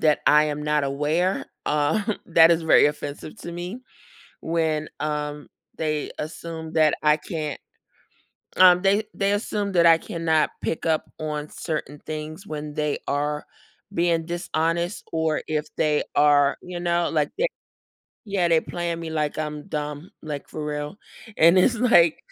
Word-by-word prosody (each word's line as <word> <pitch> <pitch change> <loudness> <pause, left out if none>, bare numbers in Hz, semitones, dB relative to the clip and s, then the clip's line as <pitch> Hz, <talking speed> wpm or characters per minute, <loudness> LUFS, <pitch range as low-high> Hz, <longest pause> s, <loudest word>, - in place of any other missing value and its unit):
that 155 -1 +3
I 150 0 +6
am 150 -1 -3
not 150 0 +1
aware, 150 +7 0 0.2
um, 200 +9 +1
that 165 -1 +6
is 165 -1 +3
very 160 - +6
offensive 150 +3 -5
to 170 - -7
me. 175 +7 -6 0.6
When, 160 -2 -1
um, 150 -1 -3 0.3
they 155 -2 -1
assume 160 +1 -6
that 155 -2 +4
I 150 0 +5
can't 155 -1 -5 1.0
um, 180 -1 +7
they 200 +2 +3
they 200 0 0
assume 205 -1 -2
that 170 -1 +4
I 165 -1 +7
cannot 160 -2 0
pick 160 - -2
up 160 -1 +1
on 150 -1 -4
certain 150 -3 -5
things 155 +5 -6
when 150 -1 -5
they 150 -1 -1
are 150 +1 -1 0.5
being 170 -2 +1
dishonest, 170 +1 -2
or 160 -1 0
if 155 -1 -1
they 150 -1 +2
are, 145 -1 +4
you 180 -1 -7
know, 175 0 +1
like 150 -2 +1
they - - +2 0.8
yeah, 195 -4 +1
they 165 -1 +5
playing 170 0 -4
me 165 -1 -5
like 155 -2 -2
I'm 150 -1 -4
dumb, 150 +3 -4
like, 150 -3 -6
for 155 -1 -5
real, 150 +4 -4 0.4
and 170 +3 +6
it's 235 +7 +4
like, 195 -10 +5
160 Hz, 155 wpm, -24 LUFS, 150-170 Hz, 1.0 s, um